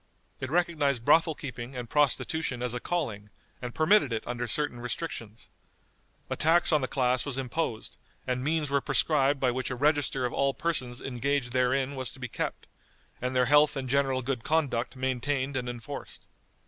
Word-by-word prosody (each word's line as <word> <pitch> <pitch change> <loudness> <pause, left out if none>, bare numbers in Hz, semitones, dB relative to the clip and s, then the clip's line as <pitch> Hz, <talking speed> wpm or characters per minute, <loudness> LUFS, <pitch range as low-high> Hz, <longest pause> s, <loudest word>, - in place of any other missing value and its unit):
It 130 - -4
recognized 150 -7 +1
brothel 160 +1 +5
keeping 125 -2 -7
and 125 -1 -5
prostitution 145 -1 0
as 125 -1 0
a 120 - -2
calling, 115 -12 -3 0.3
and 125 -1 -6
permitted 160 - +4
it 110 - -2
under 120 0 -3
certain 135 +1 -1
restrictions. 115 -2 -5 0.8
A - - -2
tax 165 +3 +4
on 150 - +4
the 130 - -1
class 125 -1 +1
was 140 -3 -1
imposed, 130 -3 -3 0.3
and 125 -1 -1
means 150 -1 0
were 140 0 +2
prescribed 140 -2 +2
by 130 -2 +2
which 130 +1 -3
a 130 - -3
register 145 -1 +1
of 125 - -2
all 140 0 +1
persons 130 -7 -1
engaged 135 0 -1
therein 130 +2 +1
was 130 -2 -3
to - - -14
be 125 - -4
kept, - - -4 0.6
and 125 +1 -2
their 125 0 +4
health 145 +2 +5
and 130 -1 -3
general 135 -1 +1
good 125 -2 -2
conduct 140 -6 0
maintained 130 +1 -1
and 125 -1 -2
enforced. 120 -3 -8
130 Hz, 175 wpm, -28 LUFS, 125-145 Hz, 0.8 s, brothel